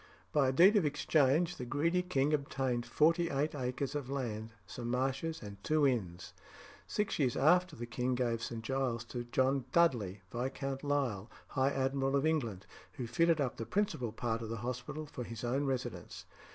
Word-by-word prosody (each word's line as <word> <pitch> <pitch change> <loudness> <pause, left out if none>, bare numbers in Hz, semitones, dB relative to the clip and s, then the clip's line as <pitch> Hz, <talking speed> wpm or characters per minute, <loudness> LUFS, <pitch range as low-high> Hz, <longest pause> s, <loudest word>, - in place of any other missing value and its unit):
By 145 -3 +3
a - - +3
deed 185 +10 +6
of 200 - +3
exchange 150 +3 +2
the - - -5
greedy 165 +7 +1
king 150 -5 +1
obtained 130 -4 -1
forty 165 +6 +3
eight 145 +3 0
acres 130 0 -2
of 145 -3 -4
land, 115 -5 -3 0.2
some 115 +6 -6
marshes, 135 +5 -1
and 100 -1 -9
two 155 -1 +3
inns. 95 -10 -1 0.5
Six 210 -5 -1
years 130 -4 +2
after 180 +6 +4
the 120 - -5
king 125 +1 -1
gave 120 -2 0
St. 115 -1 -5
Giles's 125 -2 -1
to 120 -1 -4
John 130 +2 +1
Dudley, 110 - +2
Viscount 135 +2 -3
Lisle, 130 -8 -1 0.2
High 135 0 +2
Admiral 135 0 0
of 140 +2 +2
England, 120 - 0 0.3
who 125 - -4
fitted 165 +7 +2
up 130 -4 -1
the 115 - -4
principal 185 - 0
part 115 0 -2
of 115 - -5
the 115 - -3
hospital 125 +5 -4
for 130 -4 -6
his 115 -1 -7
own 130 +4 0
residence. 120 -9 -4
130 Hz, 180 wpm, -33 LUFS, 120-145 Hz, 0.5 s, deed